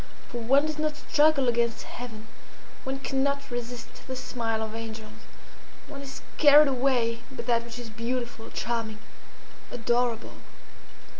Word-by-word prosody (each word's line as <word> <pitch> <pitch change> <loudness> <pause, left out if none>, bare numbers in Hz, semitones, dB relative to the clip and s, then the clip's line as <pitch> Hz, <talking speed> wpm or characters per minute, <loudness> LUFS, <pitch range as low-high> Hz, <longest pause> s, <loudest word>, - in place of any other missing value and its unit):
For 240 - -4
one 270 +6 +4
does 310 -1 -3
not 305 -1 0
struggle 295 -2 +4
against 235 -1 +1
Heaven; 225 -3 -8 0.6
one 270 +1 -3
cannot 280 0 0
resist 240 0 -6
the 260 - -3
smile 235 -3 -2
of 220 0 -5
angels; 225 -1 -6 0.8
one 280 -1 -8
is 270 -1 -8 0.2
carried 295 0 +9
away 245 -3 +2
by 265 - -6
that 235 -1 +2
which 235 0 -8
is 240 -2 -7
beautiful, 235 0 -3
charming, 230 -2 -2 0.7
adorable." 235 0 0
245 Hz, 135 wpm, -28 LUFS, 230-270 Hz, 0.8 s, carried